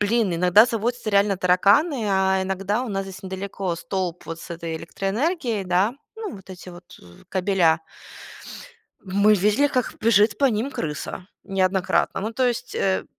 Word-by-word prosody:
блин, 205 -2 +1
иногда 180 +6 +5
заводятся 235 0 -2
реально 200 0 +3
тараканы, 205 - +3
а 190 0 +2
иногда 195 +4 -1
у - - -6
нас 195 -2 -2
здесь 190 -1 -10
недалеко 190 -1 -4
столб 180 -2 -4
вот 165 +1 -6
с - - -11
этой 165 -1 -5
электроэнергией, 220 - -2
да. 185 +6 +1 0.2
Ну, 440 -4 -6
вот 190 0 -14
эти 185 0 -10
вот, 175 0 -13
з 85 0 -17
кабеля. 180 -4 +2 1.2
Мы 200 +2 +3
видели, 210 +8 +3
как 255 -4 -1
бежит 210 -1 +3
по 280 - +4
ним 235 +2 -1
крыса 165 - -5 0.2
неоднократно. 190 0 0
Ну, 215 +3 -3
то 255 +2 +1
есть, 245 0 -3
э, 190 -1 0
195 Hz, 160 wpm, -23 LUFS, 185-225 Hz, 1.2 s, иногда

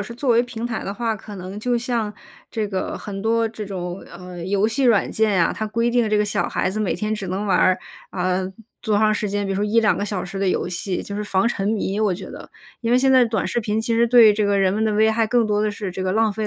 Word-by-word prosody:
是 215 +4 -6
作 255 +2 -1
为 235 0 +5
平 240 -2 -5
台 240 -2 -3
的 195 - -4
话， 230 -1 -1
可 210 +1 -10
能 190 +1 -7
就 245 +3 0
像 235 -3 -2 0.3
这 215 -2 -3
个 190 -2 -3
很 195 -2 -6
多 225 +2 +1
这 220 -1 -7
种， 180 -2 -5
呃， 180 0 -9
游 200 +2 +2
戏 250 +5 0
软 230 -5 +3
件 220 -1 +1
呀， 170 -3 +3
它 220 - -3
规 230 +2 0
定 240 -2 +2
这 215 - +2
个 210 - +2
小 210 - -1
孩 - - -1
子 205 - -4
每 215 -4 0
天 215 +4 -2
只 210 -3 -3
能 190 +3 -3
玩 195 - +2
儿， 185 0 +4 0.3
啊， 185 0 0 0.4
多 215 -3 0
长 215 +1 +3
时 210 0 -1
间， 205 +1 -1
比 195 - -3
如 - - -2
说 205 - 0
1-2 215 0 +2
个 - - -1
小 200 -3 -3
时 195 +2 -6
的 195 -1 +1
游 180 - 0
戏， 180 +1 -3
就 200 - -6
是 210 - -3
防 195 +2 +1
沉 200 -5 -2
迷， 205 -2 -1
我 210 -4 +2
觉 185 +1 -8
得。 - - -10 0.3
因 230 0 0
为 - - +6
现 265 +1 +3
在 260 -1 +6
短 225 -3 -1
视 - - -1
频 215 0 -1
其 230 +1 -2
实 230 +1 +3
对 230 -2 +7
这 205 0 0
个 200 -1 +2
人 190 -1 +3
们 215 +2 0
的 215 - +1
危 220 +1 +4
害， 225 0 +1
更 235 +2 +2
多 210 -1 +1
的 215 - +1
是 200 -2 -5
这 180 - -6
个 185 - 0
浪 220 +1 +2
费 215 +1 -3
210 Hz, 305 characters per minute, -22 LUFS, 195-225 Hz, 0.4 s, 对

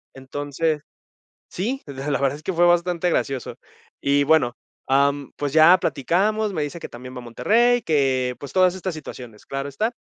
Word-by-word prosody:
Entonces, 145 +3 -2 0.7
sí, 245 +9 -3
la 140 0 -5
la 140 - 0
verdad 140 0 +1
es 150 - -14
que 190 - -2
fue 175 0 +3
bastante 175 0 +2
gracioso. 135 -5 -2 0.4
Y 140 0 +2
bueno, 140 -5 +3 0.3
am, 140 +1 +2
pues, 145 -2 -3
ya 160 +4 +7
platicamos, 195 - 0
me 160 -5 -2
dice 150 +4 -5
que - - -7
también 125 +2 -10
va - - -7
a - - -8
Monterrey, 235 - +2
que, 135 -6 +1
pues, 140 - -9
todas 185 -1 +4
estas 185 -1 -4
situaciones, 125 -7 -10
claro 135 +1 -4
está. 215 - -1
145 Hz, 180 wpm, -23 LUFS, 135-180 Hz, 0.7 s, ya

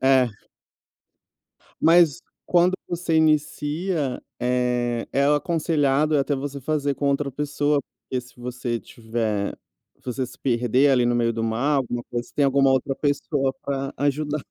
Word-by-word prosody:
é. 130 -2 +5 1.5
Mas 165 -3 +5 0.2
quando 175 +1 +3 0.2
você 175 -2 -1
inicia, 155 -1 0 0.2
eh, 125 -1 0
é 140 +1 +2
aconselhado 150 -1 +2
até 140 +1 +1
você 140 +1 -5
fazer 145 0 -1
com 140 - -2
outra 140 0 0
pessoa, 145 +1 0
porque 130 -2 -6
se 125 +1 -17
você 120 -1 -3
tiver 110 -2 -3 0.5
você 130 +1 -2
se - - -14
perder 125 +2 +2
ali 125 -2 +3
no 120 - +2
meio 115 -1 +2
do 115 0 -3
mar 115 +6 +1
alguma 120 -2 -2
coisa, 120 0 -4
você - - -21
tem 145 - +2
alguma 135 0 +4
outra 135 +1 +1
pessoa 145 -1 0
pra 135 -1 -3
ajudar. 145 +1 -1
135 Hz, 145 wpm, -24 LUFS, 125-150 Hz, 1.5 s, é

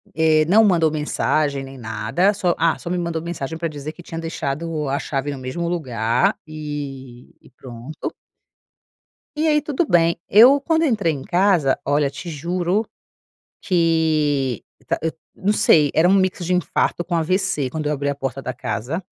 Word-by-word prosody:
eh, 155 -1 +3
não 215 +6 +6
mandou 170 -6 +3
mensagem, 150 -2 0
nem 135 0 -10
nada, 115 - 0
só, 180 -3 0
ah, 165 0 +2
só 170 - -7
me 180 - -1
mandou 170 -2 -2
mensagem 160 -2 -5
para 165 0 -2
dizer 150 0 -6
que 175 - -13
tinha 165 -1 -6
deixado 155 -1 -3
a 140 - 0
chave 140 +1 -3
no 140 - -6
mesmo 130 +7 -4
lugar 120 -8 0
e 140 -5 -7
e - - -19
pronto. 125 +4 -8 1.2
E 310 +1 0
aí, 300 -1 +3
tudo 300 +2 -1
bem. 170 -1 +3
Eu 250 +7 +7
quando 320 +2 +1
entrei 210 - +1
em 135 - -6
casa 175 -6 +2
Olha 145 0 +2
te 170 +5 -8
juro 175 +7 -1 0.8
que 155 - +1 0.2
tá - - 0
hã, 160 - 0 0.2
não 200 +2 0
sei, 150 -8 +4
era 165 +3 +4
um 190 - +4
mix 185 -2 +1
de 180 - 0
infarto 180 -1 0
com 175 - -5
AVC 165 -4 0
quando 155 +2 -4
eu - - 0
abri 145 0 -3
a 140 - -1
porta 135 -1 -4
da 130 - -4
casa, 120 - -4
160 Hz, 175 wpm, -21 LUFS, 140-175 Hz, 1.2 s, Eu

